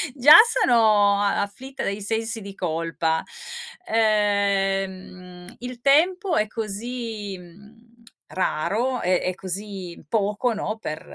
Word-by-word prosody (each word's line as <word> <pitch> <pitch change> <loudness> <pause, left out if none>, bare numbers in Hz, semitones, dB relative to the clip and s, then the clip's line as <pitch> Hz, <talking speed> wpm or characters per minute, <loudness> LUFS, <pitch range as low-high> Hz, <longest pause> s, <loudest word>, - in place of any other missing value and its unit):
Già 285 +3 +8
sono 215 - +3
a 200 0 +1
afflitta 265 +7 -8
dai 200 +1 -2
sensi 225 +2 -2
di 200 0 -9
colpa, 165 -1 -2 0.6
ehm, 195 -4 -1
il 245 0 -8
tempo 340 +6 +3
è 215 - +2
così, 220 -1 -5
mhmm, 205 +6 -17 0.4
raro 225 +8 -1
e 180 0 +2
e 185 0 -2
così 190 -2 -6
poco, 210 +3 0
no, 215 +1 -4
per 155 -7 -5
205 Hz, 115 wpm, -23 LUFS, 190-230 Hz, 0.6 s, Già